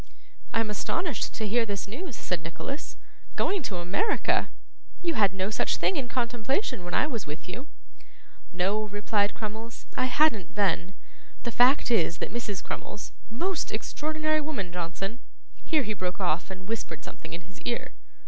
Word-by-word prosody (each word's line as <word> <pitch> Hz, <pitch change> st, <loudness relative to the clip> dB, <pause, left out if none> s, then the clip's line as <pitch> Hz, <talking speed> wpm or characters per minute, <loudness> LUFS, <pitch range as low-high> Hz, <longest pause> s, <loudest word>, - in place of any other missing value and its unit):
'I 225 Hz, -, +3 dB
am 220 Hz, -, -1 dB
astonished 325 Hz, -, 0 dB
to 220 Hz, -, -1 dB
hear 235 Hz, +3 st, +4 dB
this 200 Hz, -3 st, -2 dB
news,' 260 Hz, -, -5 dB
said 180 Hz, -5 st, -1 dB
Nicholas. 170 Hz, -, -5 dB, 0.4 s
'Going 395 Hz, -2 st, +2 dB
to 205 Hz, -9 st, -2 dB
America! 200 Hz, -, +2 dB, 0.5 s
You 340 Hz, -1 st, +2 dB
had 205 Hz, -, +5 dB
no 190 Hz, +2 st, -1 dB
such -, -, +2 dB
thing 385 Hz, -, +2 dB
in 265 Hz, -6 st, -1 dB
contemplation 240 Hz, -, 0 dB
when 175 Hz, -, -2 dB
I -, -, +5 dB
was 235 Hz, -, -3 dB
with 150 Hz, +4 st, -6 dB
you.' 240 Hz, +11 st, -5 dB, 0.8 s
'No,' 195 Hz, +4 st, +2 dB
replied 205 Hz, 0 st, +2 dB
Crummles, 220 Hz, +2 st, -5 dB
'I 255 Hz, -, +3 dB
hadn't 255 Hz, -, +3 dB
then. 195 Hz, -2 st, +2 dB, 0.5 s
The 235 Hz, -, -1 dB
fact 250 Hz, +2 st, +6 dB
is 170 Hz, -6 st, +4 dB
that -, -, -3 dB
Mrs 210 Hz, -5 st, -2 dB
Crummles 210 Hz, -, -5 dB, 0.2 s
most 345 Hz, -, -1 dB
extraordinary 310 Hz, 0 st, 0 dB
woman, 240 Hz, -, -3 dB
Johnson.' 180 Hz, +6 st, -3 dB, 0.4 s
Here 310 Hz, -4 st, +3 dB
he 215 Hz, -, -1 dB
broke 185 Hz, -1 st, -2 dB
off 180 Hz, -2 st, +1 dB
and 190 Hz, 0 st, -7 dB
whispered 210 Hz, -8 st, -3 dB
something -, -, -8 dB
in 170 Hz, -, -4 dB
his 190 Hz, +3 st, -14 dB
ear. 240 Hz, -1 st, -1 dB
215 Hz, 165 wpm, -29 LUFS, 190-260 Hz, 0.8 s, fact